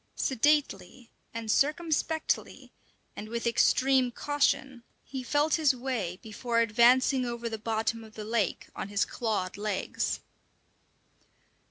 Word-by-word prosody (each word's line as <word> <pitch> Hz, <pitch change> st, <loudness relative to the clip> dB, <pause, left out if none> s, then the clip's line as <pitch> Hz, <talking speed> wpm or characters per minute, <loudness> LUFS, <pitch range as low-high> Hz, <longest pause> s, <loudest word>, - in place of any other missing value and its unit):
Sedately 270 Hz, -2 st, 0 dB, 0.2 s
and 225 Hz, -1 st, -3 dB
circumspectly, 315 Hz, +2 st, 0 dB, 0.4 s
and 215 Hz, -, -7 dB
with 235 Hz, +1 st, -3 dB
extreme 255 Hz, +2 st, +3 dB
caution, 275 Hz, -1 st, 0 dB, 0.2 s
he 265 Hz, -2 st, -5 dB
felt 290 Hz, +5 st, +1 dB
his 280 Hz, -4 st, +4 dB
way 240 Hz, -9 st, -3 dB
before 230 Hz, +2 st, -1 dB
advancing 245 Hz, +4 st, +4 dB
over 235 Hz, -1 st, -4 dB
the 220 Hz, -1 st, -4 dB
bottom 225 Hz, +1 st, -1 dB
of 220 Hz, -1 st, -15 dB
the 215 Hz, -, -6 dB
lake 220 Hz, -4 st, -1 dB
on -, -, -4 dB
his 205 Hz, +1 st, +1 dB
clawed 210 Hz, -6 st, -2 dB
legs. 205 Hz, -2 st, -2 dB
235 Hz, 120 wpm, -29 LUFS, 220-270 Hz, 0.4 s, his